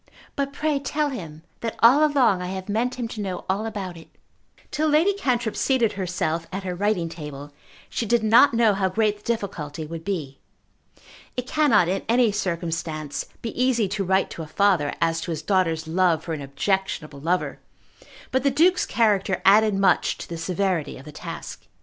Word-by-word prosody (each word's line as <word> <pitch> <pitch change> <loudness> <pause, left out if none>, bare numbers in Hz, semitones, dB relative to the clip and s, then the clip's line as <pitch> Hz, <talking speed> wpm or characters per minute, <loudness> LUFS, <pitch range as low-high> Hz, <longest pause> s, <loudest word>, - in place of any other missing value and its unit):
"But 280 0 -1
pray 300 0 0
tell 290 +2 -1
him 165 - -8 0.2
that 230 -1 -4
all 255 +6 +6
along 260 -11 +3
I 180 - -4
have 190 0 -5
meant 230 +5 0
him 240 -2 -3
to 215 - -6
know 190 -3 -4
all 200 +4 -1
about 195 -5 -5
it." 165 - -13 0.6
Till 310 +1 0
Lady 315 +7 +4
Cantrip 245 - -1
seated 245 -5 +2
herself 170 -3 -2
at 195 +1 -4
her 185 -1 -3
writing 190 -2 0
table 150 -3 -8 0.3
she 230 - -3
did 235 +1 +2
not 230 +4 +6
know 230 -2 +4
how 195 -1 0
great 210 +1 +1
the 205 - -24
difficulty 165 -9 -3
would 165 +1 -7
be. 155 -9 -4 1.0
It 250 - -2
cannot 265 - +3
in 190 +2 -1
any 235 -1 +4
circumstance 165 -6 -3 0.2
be 230 - -3
easy 240 -5 +2
to 200 0 -2
write 190 +1 +1
to - - -6
a 160 - -6
father 180 -4 +2
as 165 0 +1
to 175 - -6
his 160 -2 -3
daughter's 165 -3 +1
love 170 -1 +2
for 165 - -4
an 150 - -4
objectionable 155 0 -2
lover; 170 +5 -1 0.7
but 260 - +2
the 280 - +3
Duke's 340 +7 +3
character 205 -5 +2
added 210 +1 +6
much 195 0 +2
to - - -8
the 170 - -6
severity 180 -2 -1
of 130 - -13
the 150 - -9
task. - - -8
195 Hz, 185 wpm, -24 LUFS, 165-235 Hz, 1.0 s, all